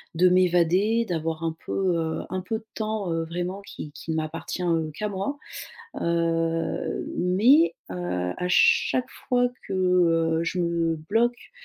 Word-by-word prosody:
de 180 +2 +5
m'évader, 185 +5 +3
d'avoir 160 -1 -2
un 165 -1 -1
peu, 185 -3 0
heu, 160 -1 -2
un 185 - -2
peu 220 +5 -3
de 220 - -23
temps, 215 -4 -2
heu, 165 0 0
vraiment 175 +4 -4
qui 155 -6 -8
qui 160 - -6
ne - - -1
m'appartient, 160 +3 -4
heu, 165 -3 0
qu'à 210 +7 -3
moi, 200 +9 -3 0.6
heu, 165 -1 0
mais 225 - +4 0.2
heu, - - -4 0.4
à 180 - -2
chaque 255 +7 +3 0.2
fois 245 -1 +3 0.2
que, - - -4
heu, 170 -3 +3
je 175 +2 -2
me 170 -1 +1
bloque 225 +10 -1
180 Hz, 155 wpm, -25 LUFS, 165-200 Hz, 0.6 s, de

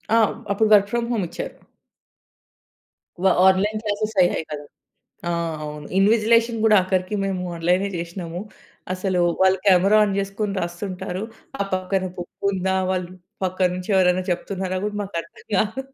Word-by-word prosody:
ఆ! - - +5 0.4
అప్పుడు 215 +2 +2
work 200 -1 +6
from 235 0 -1
home 215 -6 0
ఇచ్చారు. - - -6 1.7
వ - - +1 0.2
ఆన్‌లైన్ 205 +3 +1
క్లాస్ 215 +1 -2
అయ్యాయి 175 -2 +2
కదా! 145 -1 -5 0.7
ఆ! - - +1 0.3
అవును. 150 0 -7
ఇన్విజిలేషన్ 230 +3 +3
కూడా 215 -1 +6
ఆఖరికి 185 +2 -1
మేము 190 -2 -2
ఆన్‌లైనే 180 +4 +1
చేశ్నము. 170 0 -5 0.5
అసలు 185 -1 0 0.2
వాళ్ళు 190 0 +4
కెమెరా 195 +2 +5
ఆన్ 200 -2 -1
చేసుకొని 200 +1 -2
రాస్తుంటారు. 180 +1 -4 0.4
ఆ - - +4
పక్కన 185 +1 -1
బుక్ 175 +2 -6
ఉందా, 190 0 0 0.2
వాళ్ళు 180 -1 -2 0.3
పక్కన 185 0 +1
నుంచి 180 +3 -6
ఎవరైనా 185 0 +3
చెప్తున్నారా 185 +1 -2
కూడా 210 0 -4
మాకు 195 -3 -6
అర్థం 170 - -18
కాదు. 220 +6 0
190 Hz, 145 wpm, -23 LUFS, 180-205 Hz, 1.7 s, work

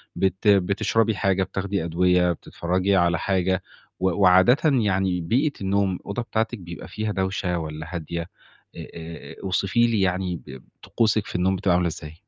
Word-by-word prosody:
بت 95 +2 -1
بتشربي 100 +3 +3
حاجة، 95 -1 +1
بتاخدي 95 0 -3
أدوية، 90 +1 +2
بتتفرجي 90 +3 -1
على 85 -2 +2
حاجة 95 -1 0 0.4
و 95 0 +2
وعادةً 95 +7 +6
يعني 95 - +2
بيئة 130 - +1
النوم، 100 0 +1
الأوضة 100 +6 -5
بتاعتِك 115 0 -2
بيبقى 85 -1 -9
فيها 110 0 -3
دوشة 95 -2 -1
والّا 80 0 -6
هادية، 85 0 -4 0.5
آآ - - -8
آآ 80 -2 -9
أوصفي 100 +5 +2
لي 115 -4 +1
يعني 90 -1 0
ب 65 -4 -12 0.2
طقوسِك 110 -2 +1
في - - -8
النوم 95 +2 +2
بتبقى 95 -1 +1
عاملة 90 0 +2
إزاي؟ 75 -1 -7
95 Hz, 155 wpm, -24 LUFS, 90-100 Hz, 0.5 s, وعادةً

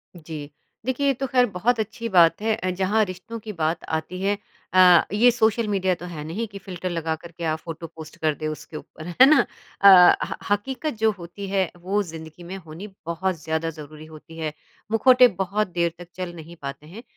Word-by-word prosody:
जी, 155 -3 -8 0.4
देखिए 260 +2 0
ये 275 - +4
तो 270 +2 -3
खैर 250 -1 +4
बहुत 220 +6 0
अच्छी 225 +2 -3
बात 170 0 +5
है, 220 0 +1
अ, 185 -4 -3
जहाँ 195 +4 +1
रिश्तों 185 +5 -8
की 215 -1 -7
बात 160 0 -1
आती 160 +4 -3
है 200 +1 +1 0.4
अ, 180 -2 +8
ये 240 +4 +6
सोशल 225 -1 +1
मीडिया 190 -2 +1
तो 175 - -10
है 150 -3 -6
नहीं 215 +8 -3
कि 200 -1 -10
फिल्टर 185 -1 -5
लगा 165 -2 -2
कर 170 +2 -13
के 170 +1 -9
आप 155 0 -1
फ़ोटो 165 0 -7
पोस्ट 160 0 -12
कर 155 -1 +2
दें 155 - -4
उसके 155 0 -6
ऊपर 155 +2 -11
है 175 +9 +6
ना? 310 +3 +5 0.4
अ, 190 -3 +9
ह - - -5 0.2
हकीकत 265 +8 -1
जो 220 0 +4
होती 175 +3 -8
है 190 -3 +1
वो 200 +3 0
ज़िंदगी 160 -1 -10
में 185 +3 -7
होनी 170 +3 -9 0.2
बहुत 175 +2 -1
ज़्यादा 160 +1 -1
ज़रूरी 155 0 -10
होती 160 +1 -13
है, 155 -2 -3 0.4
मुखौटे 250 +2 +6 0.2
बहुत 205 +3 -1
देर 170 -1 +1
तक 175 0 -11
चल 180 -1 -5
नहीं 165 +1 -11
पाते 140 +1 -7
हैं 210 +8 -11
180 Hz, 210 wpm, -24 LUFS, 160-210 Hz, 0.4 s, अ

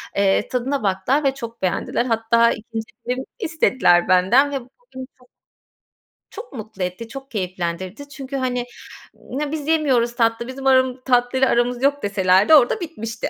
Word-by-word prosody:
Eee, 200 -1 +2
tadına 255 0 -2
baktılar 200 +10 +1
ve 270 -1 +2
çok 235 -3 -9
beğendiler. 190 +6 -1
Hatta 230 0 +2
ikinci 225 0 -6 0.2
dilim 255 +2 -3
istediler 260 - +2
benden 205 +11 +4
ve 275 - -2
bu 245 - -18 0.3
beni 260 0 -6
çok 250 -1 -24 1.0
çok 470 - -10
mutlu 215 -5 -6
etti, 180 +6 -5
çok 270 +2 -10
keyiflendirdi. 185 +5 -4
Çünkü, 275 -1 -8
hani, 250 -2 -1 0.8
"Ya 295 -1 -2
biz 305 -2 -4
yemiyoruz 260 -7 +1
tatlı, 230 0 0
bizim 270 +1 -5
aram 260 -1 +3
tatlıyla 255 +1 +2
aramız 240 +1 0
yok." 285 +1 +1
deselerdi 195 +5 +3
orada 280 - +4
bitmişti. 225 -9 -5
245 Hz, 155 wpm, -21 LUFS, 215-270 Hz, 1.0 s, benden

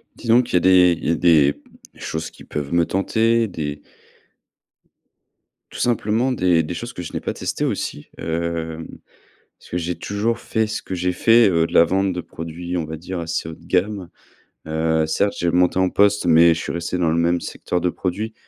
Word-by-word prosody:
Disons 120 +1 +3
qu'il 120 - -8
y - - +5
a - - +5
des 90 -2 +5
il - - -4
y - - +4
a - - +2
des 75 -5 +4 0.4
choses 80 +1 -5
qui - - -15
peuvent 75 +1 -5
me 85 -1 +3
tenter, 115 +4 +1
des 75 -5 -5 1.9
tout - - -9
simplement 120 +2 +1
des 90 -8 +2
des 85 - -5
choses 120 +7 -6
que 90 - -6
je 85 - -8
n'ai - - -2
pas - - -4
testées - - -3
aussi, 75 - -3
hem, 80 -1 -3 0.7
parce - - -18
que 90 - -1
j'ai 85 +1 -3
toujours 105 +3 -2
fait 110 -1 -1
ce 110 - -4
que 95 - -5
j'ai 90 +1 -1
fait, 115 +4 +5
heu, 80 -1 +2
de - - -10
la 85 - +7
vente 95 +2 0
de 90 - -3
produits, 85 +2 -6
on 85 - -1
va 80 +1 -6
dire 90 +3 -6
assez 80 -1 -3
haut 80 - -7
de 85 - -20
gamme, 95 0 -1 0.6
heu, 80 0 0
certes, 100 +6 0
j'ai 85 - 0
augmenté 90 +1 +2
en 95 -1 +3
poste, 100 -1 +2
mais 85 0 +6
je 80 - -4
suis - - -4
resté 85 +1 -3
dans 85 -3 +1
le 85 - +1
même 85 +1 +1
secteur 90 -1 -3
de 90 - +1
produits. 105 +6 -3
90 Hz, 210 wpm, -21 LUFS, 80-100 Hz, 1.9 s, la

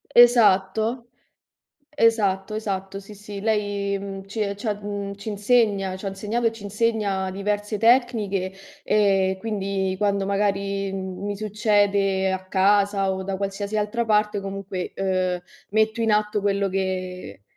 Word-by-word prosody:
Esatto. 230 0 +5 0.9
Esatto, 215 -6 +2
esatto, 195 -2 -3
sì, 200 +2 -11
sì. 205 0 -8
Lei, 205 -2 0
mhmm, 195 0 -7
ci 210 +3 -5
e 200 -1 -1
ci 215 +3 -8
ha, 210 - +1
mhmm, 205 -1 -5
ci 200 +2 -8
insegna, 205 -3 +2
ci 195 - -8
ha - - +1
insegnato 210 +5 -2
e 225 - +2
ci 225 - -12
insegna, 205 -2 0
diverse 205 +2 -2
tecniche, 215 -5 +2 0.3
e 195 -2 +2
quindi, 195 -3 -2
quando 200 -1 +1
magari, 200 0 0
mhmm, 190 0 -5
mi 205 0 -3
succede 205 -2 +1
a 190 0 -3
casa 195 0 +3
o 190 0 -3
da 195 0 -3
qualsiasi 200 +2 -3
altra 215 +3 0
parte, 210 -1 +2
comunque, 195 -1 -5
uhm, 185 -2 0 0.3
metto 220 +2 +1
in 225 -1 +2
atto 210 0 +1
quello 200 0 +1
che 185 - -4
200 Hz, 145 wpm, -24 LUFS, 195-210 Hz, 0.9 s, Esatto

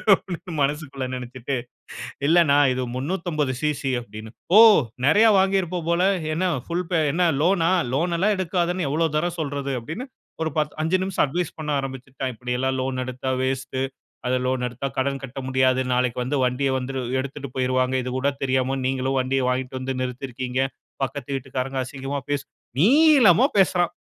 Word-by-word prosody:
அப்பிடீன்னு 175 -1 -8
மனசுக்குள்ள 140 -2 -2
நினைச்சுட்டு, 125 +1 -5 0.7
இல்ல 170 - +5
அண்ணா, 140 0 +4 0.2
இது 130 0 -2
350 150 -2 -1
சிசி 150 -3 -1
அப்பிடீன்னேன். 110 -1 -10 0.2
"ஓ! - - +11 0.5
நிறைய 210 +9 +6
வாங்கியிருப்ப 190 -2 +1
போல. 170 +1 +2 0.3
என்ன 185 +3 0 0.2
புல்பே 175 0 0
என்ன 175 +2 +2 0.2
லோனா? 175 -1 +3 0.2
லோன் 170 +5 +1
எல்லாம் 210 +3 +3
எடுக்காதேன்னு 175 -2 0
எவ்வளோ 165 +2 +1
தரம் 175 +2 -2
சொல்றது?" 140 -2 -3
அப்பிடீன்னு 160 - -6 0.4
ஒரு 160 - 0
10, 150 -1 0
5 165 +4 +2
நிமிஷம் 190 -4 +1
அட்வைஸ் 170 +4 -3
பண்ண 155 -1 -4
ஆரம்பிச்சுட்டான். 130 0 -5
"இப்பிடி 125 +2 -4
எல்லாம் 130 0 0
லோன் 130 -1 -2
எடுத்தா 130 +1 -4
வேஸ்ட்டு, 130 0 -2 0.4
அது 130 0 +2
லோன் 130 -1 0
எடுத்தா 125 +3 -5
கடன் 135 +1 -1
கட்ட 135 +1 -8
முடியாது. 130 0 +3
நாளைக்கு 125 -1 0
வந்து 145 +3 -1
வண்டிய 135 +2 0
வந்துரு 130 +1 -4 0.2
எடுத்துட்டு 140 0 -6
போயிருவாங்க. 130 0 +1
இது 125 - -4
கூட 140 +2 +1
தெரியாம 130 0 +1
நீங்களும் 130 0 0
வண்டியை 130 0 0
வாங்கிட்டு 130 +1 -2
வந்து 130 0 -3
நிறுத்திருக்கீங்க. 125 0 -3 0.4
பக்கத்து 140 0 -5
வீட்டுக்காரங்க 135 0 -3
அசிங்கமா 135 +1 -5
பேசு 145 -1 -1 0.3
நீளமா 255 - +6
பேசுறான், 180 -3 +3
135 Hz, 155 wpm, -23 LUFS, 130-170 Hz, 0.7 s, ஓ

